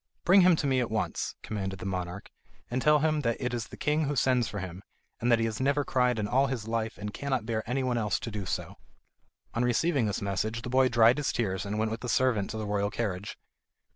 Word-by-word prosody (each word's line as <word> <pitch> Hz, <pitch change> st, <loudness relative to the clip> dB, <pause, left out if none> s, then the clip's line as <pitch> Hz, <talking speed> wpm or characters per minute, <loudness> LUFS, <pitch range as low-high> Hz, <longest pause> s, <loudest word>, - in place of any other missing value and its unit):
"Bring 190 Hz, +2 st, +7 dB
him 180 Hz, -1 st, +6 dB
to 155 Hz, -, -2 dB
me 135 Hz, -2 st, +2 dB
at 120 Hz, -, -1 dB
once," 110 Hz, 0 st, -2 dB
commanded 95 Hz, -3 st, -4 dB
the -, -, -8 dB
monarch, 90 Hz, -2 st, -4 dB, 0.4 s
"and 130 Hz, +1 st, 0 dB
tell 150 Hz, +2 st, +5 dB
him 155 Hz, 0 st, +2 dB
that 115 Hz, -4 st, 0 dB
it 125 Hz, -2 st, -2 dB
is 120 Hz, -2 st, -3 dB
the -, -, -11 dB
king 150 Hz, +1 st, +1 dB
who 145 Hz, +1 st, -1 dB
sends 125 Hz, -2 st, +2 dB
for 105 Hz, -, -6 dB
him, 95 Hz, -1 st, -6 dB, 0.4 s
and 120 Hz, +1 st, +1 dB
that 120 Hz, -, +6 dB
he 115 Hz, -, 0 dB
has 110 Hz, +2 st, -3 dB
never 140 Hz, +1 st, +2 dB
cried 125 Hz, -2 st, +2 dB
in 105 Hz, -1 st, -1 dB
all 135 Hz, +5 st, +3 dB
his 125 Hz, -5 st, -4 dB
life 115 Hz, -1 st, -2 dB
and 105 Hz, 0 st, -5 dB
cannot 135 Hz, -5 st, -2 dB
bear 110 Hz, -1 st, -1 dB
anyone 125 Hz, -2 st, 0 dB
else 105 Hz, -3 st, 0 dB
to 115 Hz, -, -5 dB
do 100 Hz, -3 st, -5 dB
so." -, -, -4 dB, 0.8 s
On 120 Hz, -, 0 dB
receiving 125 Hz, +1 st, +2 dB
this 100 Hz, -, -2 dB
message 110 Hz, +4 st, -2 dB
the 125 Hz, -, -4 dB
boy 130 Hz, 0 st, +4 dB
dried 120 Hz, +1 st, +5 dB
his 145 Hz, -, 0 dB
tears 95 Hz, -4 st, -2 dB
and 105 Hz, +1 st, -2 dB
went 110 Hz, 0 st, 0 dB
with 115 Hz, -, -4 dB
the 125 Hz, -, -4 dB
servant 115 Hz, -6 st, +2 dB
to 110 Hz, -, -4 dB
the 110 Hz, -, -3 dB
royal 100 Hz, 0 st, 0 dB
carriage. 105 Hz, -3 st, -3 dB
115 Hz, 245 wpm, -29 LUFS, 105-130 Hz, 0.8 s, Bring